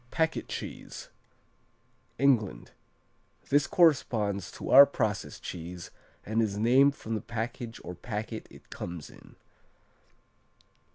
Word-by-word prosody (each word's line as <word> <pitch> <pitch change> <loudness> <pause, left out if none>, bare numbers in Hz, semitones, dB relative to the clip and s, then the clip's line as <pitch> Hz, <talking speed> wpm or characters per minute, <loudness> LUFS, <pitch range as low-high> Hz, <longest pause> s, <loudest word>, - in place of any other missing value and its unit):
Packet 160 +3 0
cheese - - -7 1.1
England 125 -6 +1 0.8
This 145 +1 +3
corresponds 110 - +2
to - - -6
our 140 +1 +10
process 105 -7 -2
cheese 85 0 -7 0.3
and 110 +2 +1
is 105 -2 -1
named 130 +6 +4
from 115 - -6
the 110 - -2
package 115 +1 -5
or 90 - -6
packet 110 +3 -5
it - - -17
comes 85 -4 -7
in. - - -17
115 Hz, 110 wpm, -29 LUFS, 100-135 Hz, 1.1 s, our